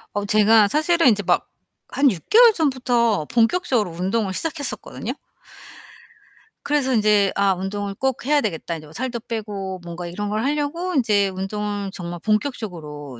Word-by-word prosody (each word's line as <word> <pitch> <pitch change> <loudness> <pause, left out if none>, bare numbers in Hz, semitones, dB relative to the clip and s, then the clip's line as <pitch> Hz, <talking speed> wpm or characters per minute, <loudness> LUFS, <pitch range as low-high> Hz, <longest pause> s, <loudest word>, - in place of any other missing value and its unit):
어, 205 0 -1
제가 215 +1 +5
사실은 315 - +2
인제 205 -2 +1
막 175 -1 +1 0.4
한 280 0 +3
6 185 -9 -6
개월 465 +1 +7
전부터 245 - +1
본격적으로 235 - +1
운동을 190 +4 -1
시작했었거든요. 310 - -4 1.5
그래서 280 -3 +1
인제 210 -3 +3
'아 200 -1 +3
운동을 200 +2 -4
꼭 265 +2 -2
해야 295 +2 +3
되겠다. 170 - -3
인제 155 -1 -9
뭐 150 - -15
살도 240 +3 -3
빼고.' 200 -4 -5
뭔가 175 0 -7
이런 205 +4 -4
걸 215 +2 -1
하려고 300 +6 -2
인제 210 -7 +3
운동을 200 +1 -4
정말 175 -2 -6
본격적으로 170 - -3
210 Hz, 330 characters per minute, -22 LUFS, 190-260 Hz, 1.5 s, 개월